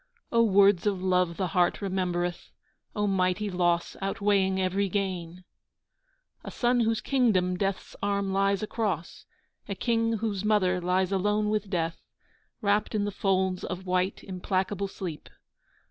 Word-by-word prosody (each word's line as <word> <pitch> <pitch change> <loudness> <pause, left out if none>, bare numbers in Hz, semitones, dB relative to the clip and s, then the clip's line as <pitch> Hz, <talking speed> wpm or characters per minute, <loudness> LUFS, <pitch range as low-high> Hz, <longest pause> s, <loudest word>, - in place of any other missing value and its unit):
(O 230 - +4
words 200 -3 +4
of 195 -3 -1
love 180 -2 +1
the 185 -3 -1
heart 175 +1 +2
remembereth, 180 -3 -2 0.5
O 210 - 0
mighty 195 +1 0
loss 175 -1 +1
outweighing 195 -1 +1
every 190 +1 0
gain!) 185 -3 -3 1.0
A - - -6
Son 245 0 +1
whose 225 -1 +1
kingdom 210 -9 +2
Death's 195 +1 -3
arm 200 -1 0
lies 195 +1 +1
across, 210 -5 -3 0.4
A - - -2
King 230 -1 +1
whose 215 -3 -2
Mother 190 -4 +2
lies 180 +1 +1
alone 210 +2 +1
with 210 -2 -1
Death 165 -3 -2 0.6
Wrapped 205 +1 +1
in 205 -1 +1
the 205 - -2
folds 190 -2 0
of 180 +1 -5
white 185 +1 0
implacable 190 +1 -2
sleep. 180 -5 -7
195 Hz, 140 wpm, -27 LUFS, 180-205 Hz, 1.0 s, O